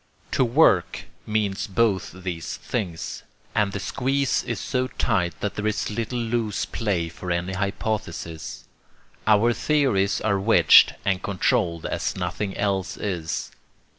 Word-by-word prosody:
To -, -, +3 dB
'work' 120 Hz, -, +3 dB, 0.2 s
means 105 Hz, -2 st, 0 dB
both 100 Hz, -1 st, +1 dB
these 85 Hz, -3 st, -4 dB
things; 90 Hz, -8 st, -4 dB, 0.3 s
and 105 Hz, -2 st, +2 dB
the 100 Hz, -, -4 dB
squeeze 135 Hz, +5 st, 0 dB
is -, -, -3 dB
so 130 Hz, -1 st, -1 dB
tight 90 Hz, -10 st, -1 dB
that 105 Hz, -, -1 dB
there 105 Hz, 0 st, -2 dB
is 110 Hz, 0 st, -1 dB
little 115 Hz, +3 st, -3 dB
loose 115 Hz, -3 st, -1 dB
play 95 Hz, -7 st, -1 dB
for 85 Hz, +2 st, -8 dB
any 85 Hz, +2 st, -1 dB
hypothesis. 100 Hz, -4 st, -3 dB, 0.6 s
Our 110 Hz, +2 st, +5 dB
theories 120 Hz, -8 st, +2 dB
are 100 Hz, -3 st, +1 dB
wedged 110 Hz, +4 st, +6 dB
and 95 Hz, -2 st, +1 dB
controlled 85 Hz, -4 st, 0 dB
as -, -, -2 dB
nothing 95 Hz, +2 st, -3 dB
else 95 Hz, -3 st, -1 dB
is. 85 Hz, -6 st, -3 dB
100 Hz, 135 wpm, -24 LUFS, 90-115 Hz, 0.6 s, wedged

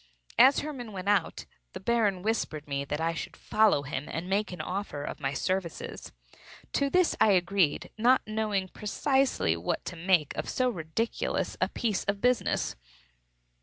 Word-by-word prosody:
As 265 Hz, +3 st, +7 dB
Hermann 255 Hz, -7 st, -6 dB
went 190 Hz, 0 st, -6 dB
out, 205 Hz, -1 st, +1 dB, 0.3 s
the -, -, -6 dB
Baron 205 Hz, -3 st, +1 dB
whispered 180 Hz, -9 st, -2 dB
me 140 Hz, -1 st, -2 dB
that 150 Hz, +2 st, -3 dB
I 165 Hz, +1 st, 0 dB
should 160 Hz, -, -6 dB
follow 215 Hz, -9 st, +3 dB
him 140 Hz, +1 st, -4 dB
and 170 Hz, +2 st, -4 dB
make 200 Hz, +2 st, 0 dB
an 180 Hz, -, -7 dB
offer 185 Hz, -7 st, -4 dB
of -, -, -5 dB
my 135 Hz, -2 st, -1 dB
services. 185 Hz, +3 st, -3 dB, 0.6 s
To 280 Hz, -1 st, +2 dB
this 360 Hz, +2 st, +3 dB
I 210 Hz, -, +6 dB
agreed; 180 Hz, -3 st, +1 dB
not 250 Hz, +3 st, +4 dB
knowing 215 Hz, -3 st, -1 dB
precisely 260 Hz, -, +1 dB
what 85 Hz, +1 st, -3 dB
to 180 Hz, -, -5 dB
make 170 Hz, -3 st, +2 dB
of -, -, -3 dB
so 255 Hz, -1 st, +1 dB
ridiculous 175 Hz, +5 st, -2 dB
a -, -, +2 dB
piece 220 Hz, -5 st, -1 dB
of 200 Hz, 0 st, -1 dB
business. 250 Hz, +2 st, +1 dB
195 Hz, 165 wpm, -29 LUFS, 165-225 Hz, 0.6 s, As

